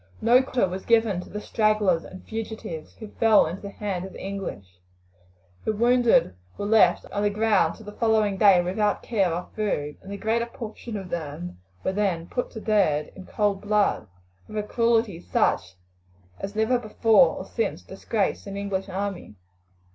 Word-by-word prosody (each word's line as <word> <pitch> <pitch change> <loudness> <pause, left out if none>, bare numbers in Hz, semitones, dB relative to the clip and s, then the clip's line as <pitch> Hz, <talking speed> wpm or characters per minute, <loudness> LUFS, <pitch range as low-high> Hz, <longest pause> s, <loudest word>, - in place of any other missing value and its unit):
No 240 +3 +5
quarter 255 -5 0
was 185 +1 -5
given 225 -5 +2
to - - -12
the 210 - -5
stragglers 210 -6 +1
and 185 - -11
fugitives 220 -7 -6
who 220 - -9
fell 225 -2 +6
into 170 +4 -5
the 200 - -6
hands 200 -3 -4
of 190 - -13
the - - -10
English. 100 - -6 0.8
Their 215 - -1
wounded 240 - +4 0.2
were - - -3
left 220 +1 +4
on 205 - -2
the 205 - +2
ground 205 -5 +2
till 220 - -14
the 210 - -7
following 215 -2 +2
day 190 -3 +6
without 205 +3 0
care 195 -7 +1
or 175 +2 -4
food, 150 -9 -2
and 195 - -10
the 200 - -4
greater 230 +3 0
portion 230 -1 -7
of 190 -2 -7
them 145 - -5 0.2
were 190 - 0
then 190 -5 0
put 245 +7 -3
to 220 - -8
death 175 -9 +1
in 190 - -11
cold 205 -2 0
blood, 210 - +1 0.4
with 215 - -7
a 210 - 0
cruelty 225 -4 +1
such 90 - 0 0.6
as 195 +1 -6
never 220 +3 +2
before 225 +2 +4
or - - -6
since 460 - -3
disgraced 205 -2 -2
an 200 0 -5
English 200 -1 -3
army. 195 - -4
205 Hz, 180 wpm, -25 LUFS, 185-220 Hz, 0.8 s, fell